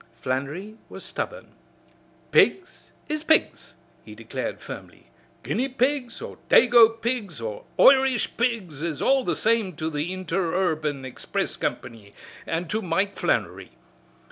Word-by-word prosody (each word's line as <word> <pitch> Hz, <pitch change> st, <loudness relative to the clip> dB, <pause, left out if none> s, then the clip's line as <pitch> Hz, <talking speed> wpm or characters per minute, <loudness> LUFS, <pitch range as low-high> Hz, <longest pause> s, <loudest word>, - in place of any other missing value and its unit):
Flannery 150 Hz, +12 st, -4 dB
was -, -, -7 dB
stubborn. -, -, -5 dB, 0.8 s
"Pigs 370 Hz, -1 st, +2 dB, 0.2 s
is 305 Hz, 0 st, -2 dB
pigs," 315 Hz, 0 st, +1 dB, 0.3 s
he -, -, -12 dB
declared -, -, -5 dB
firmly. -, -, -10 dB, 0.4 s
"Guinea 265 Hz, +3 st, -1 dB
pigs, 255 Hz, -1 st, -1 dB
or -, -, -9 dB
dago 230 Hz, -2 st, +6 dB
pigs 225 Hz, -, -2 dB
or 110 Hz, -2 st, -6 dB
Irish 265 Hz, +3 st, +5 dB
pigs 220 Hz, -, -1 dB
is 160 Hz, -4 st, -3 dB
all 270 Hz, -1 st, +3 dB
the 175 Hz, -8 st, 0 dB
same 220 Hz, -5 st, +1 dB
to 160 Hz, +1 st, -3 dB
the 150 Hz, +4 st, -2 dB
Interurban 165 Hz, -6 st, -1 dB
Express 130 Hz, -, -3 dB
Company 105 Hz, -3 st, -5 dB, 0.3 s
an' 165 Hz, +1 st, -2 dB
to 220 Hz, -, -1 dB
Mike 190 Hz, +2 st, 0 dB
Flannery. -, -, -1 dB
190 Hz, 125 wpm, -25 LUFS, 155-245 Hz, 0.8 s, dago